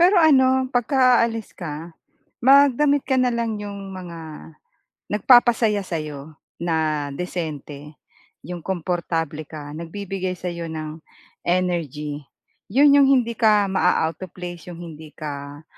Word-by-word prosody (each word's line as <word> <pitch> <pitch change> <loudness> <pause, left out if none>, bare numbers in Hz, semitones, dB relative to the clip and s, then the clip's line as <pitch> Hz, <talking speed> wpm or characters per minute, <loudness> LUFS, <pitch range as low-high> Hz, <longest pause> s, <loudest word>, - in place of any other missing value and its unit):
Pero 365 +3 +6
ano, 260 -5 +5
pagka-aalis 245 -3 +2
ka 165 0 -7 0.5
magdamit 280 +1 +5
ka 265 - +2
na 250 -1 +2
lang 230 -2 -1
'yong 200 -1 -7
mga 175 -3 -8 0.9
nagpapasaya 225 -1 +4
sa'yo 155 -3 -6 0.2
na 155 -3 0
disente, 150 -4 -6 0.5
'yong 175 -1 -6
komportable 165 -4 -2
ka, 145 -2 -8
nagbibigay 185 +2 -4
sa 180 - -5
'yo 170 -1 -5
ng 155 0 -6 0.5
energy, 155 -5 -1 0.5
'yon 280 +4 +6
'yong 280 -1 +6
hindi 240 -3 +3
ka 210 -3 +4
ma-a-out 165 -2 +1
place 175 -1 -8
'yong 170 - -10
hindi 160 -2 -10
ka, 145 0 -7
180 Hz, 120 wpm, -22 LUFS, 155-235 Hz, 0.9 s, Pero